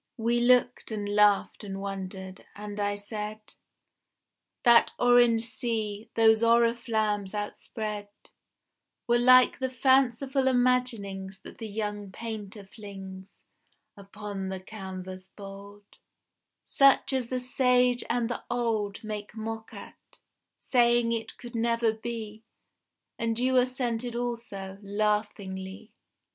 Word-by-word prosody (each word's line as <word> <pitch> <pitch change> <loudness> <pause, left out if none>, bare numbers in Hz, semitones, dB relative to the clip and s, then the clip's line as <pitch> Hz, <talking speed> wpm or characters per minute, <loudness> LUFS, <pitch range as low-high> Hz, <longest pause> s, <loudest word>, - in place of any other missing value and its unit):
We 235 +1 +1
looked 245 0 +3
and 205 -2 -3
laughed 205 +1 +3
and 195 -1 -5
wondered, 190 -1 -6
and 205 0 -7
I 205 0 0
said: 210 +1 -6 1.1
That 235 -1 +6
orange 240 -2 +5
sea, 225 -3 -2
those 220 -1 +5
oriflammes 230 -3 +2
outspread 210 0 -4 1.0
Were 240 0 +3
like 255 +1 +6
the 260 0 -1
fanciful 265 +1 +2
imaginings 230 -7 0
That - - -12
the 225 - -5
young 205 -1 -4
painter 215 -1 -7
flings 195 -2 -11 0.5
Upon 200 -1 -6
the 190 0 -4
canvas 185 -2 -8
bold, 200 0 -11 0.8
Such 275 0 +4
as 255 -3 0
the 255 +1 -2
sage 250 -1 +2
and 240 -2 +1
the 240 - -4
old 225 -4 -1
Make 210 0 -6
mock 220 0 -5
at, - - -13 0.4
saying 240 -2 +3
it 230 -1 -3
could 245 -1 -10
never 230 -1 +1
be 220 -1 -6 0.8
And 230 -1 -1
you 255 +2 +1
assented 245 -2 0
also, 230 -5 -4
laughingly. 205 -1 -2
220 Hz, 110 wpm, -28 LUFS, 205-240 Hz, 1.1 s, That